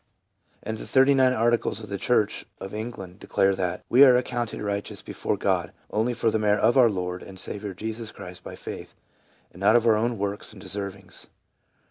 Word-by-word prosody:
And 110 Hz, -, -4 dB
the -, -, -7 dB
Thirty 135 Hz, +1 st, +5 dB
nine 130 Hz, -1 st, +4 dB
Articles 120 Hz, -2 st, +1 dB
of 110 Hz, -, -9 dB
the 100 Hz, -1 st, -4 dB
church 110 Hz, -1 st, +1 dB
of 95 Hz, -, -7 dB
England 105 Hz, -4 st, -6 dB
declare 95 Hz, -1 st, +1 dB
that, 90 Hz, -2 st, -2 dB
"We 130 Hz, +4 st, +7 dB
are 130 Hz, -3 st, +8 dB
accounted 120 Hz, -2 st, -2 dB
righteous 100 Hz, -1 st, -4 dB
before -, -, -3 dB
God, -, -, 0 dB, 0.2 s
only 115 Hz, +3 st, 0 dB
for 115 Hz, -1 st, +1 dB
the 110 Hz, -, +1 dB
merit 105 Hz, -1 st, +2 dB
of 115 Hz, +3 st, +4 dB
our 125 Hz, -3 st, +6 dB
Lord 90 Hz, -2 st, -3 dB
and 95 Hz, -1 st, -10 dB
Saviour 100 Hz, -1 st, -4 dB
Jesus 110 Hz, +2 st, -5 dB
Christ 90 Hz, 0 st, -10 dB
by -, -, -8 dB
faith, -, -, -8 dB, 0.6 s
and 90 Hz, -, -15 dB
not 110 Hz, +5 st, +5 dB
for 115 Hz, -, +5 dB
our -, -, +1 dB
own 120 Hz, -1 st, -1 dB
works 100 Hz, +1 st, -4 dB
and 105 Hz, -, -13 dB
deservings." 95 Hz, -1 st, -5 dB
105 Hz, 195 wpm, -25 LUFS, 95-120 Hz, 0.6 s, are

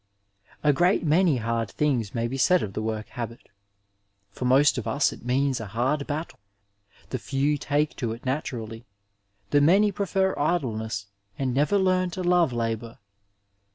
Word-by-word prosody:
A 150 Hz, -1 st, +4 dB
great 175 Hz, +6 st, +2 dB
many 160 Hz, -1 st, +3 dB
hard 115 Hz, -1 st, -2 dB
things 125 Hz, -9 st, -1 dB
may 115 Hz, 0 st, 0 dB
be 130 Hz, -, -4 dB
said 180 Hz, +7 st, +3 dB
of 100 Hz, -, -5 dB
the 110 Hz, -, -3 dB
work 110 Hz, -1 st, -3 dB
habit: 115 Hz, -2 st, -7 dB, 0.8 s
For 125 Hz, -, -5 dB
most 135 Hz, +1 st, +4 dB
of 115 Hz, -, -6 dB
us 140 Hz, +6 st, +1 dB
it -, -, -13 dB
means 130 Hz, +1 st, +1 dB
a 115 Hz, -, -6 dB
hard 130 Hz, +8 st, -1 dB
battie; 155 Hz, +3 st, -4 dB, 0.8 s
the 130 Hz, -, -2 dB
few 140 Hz, +4 st, 0 dB
take 145 Hz, +1 st, -1 dB
to 120 Hz, -4 st, -2 dB
it 115 Hz, +3 st, -8 dB
naturally; 115 Hz, -5 st, -4 dB, 0.6 s
the 145 Hz, -, +4 dB
many 195 Hz, +8 st, +5 dB
prefer 195 Hz, -1 st, 0 dB
idleness 115 Hz, -, -1 dB, 0.3 s
and 130 Hz, -2 st, -1 dB
never 150 Hz, +10 st, +2 dB
learn 185 Hz, -1 st, +2 dB
to 185 Hz, -, -2 dB
love 175 Hz, -4 st, +3 dB
labour. 115 Hz, -1 st, -3 dB
135 Hz, 160 wpm, -26 LUFS, 115-155 Hz, 0.8 s, many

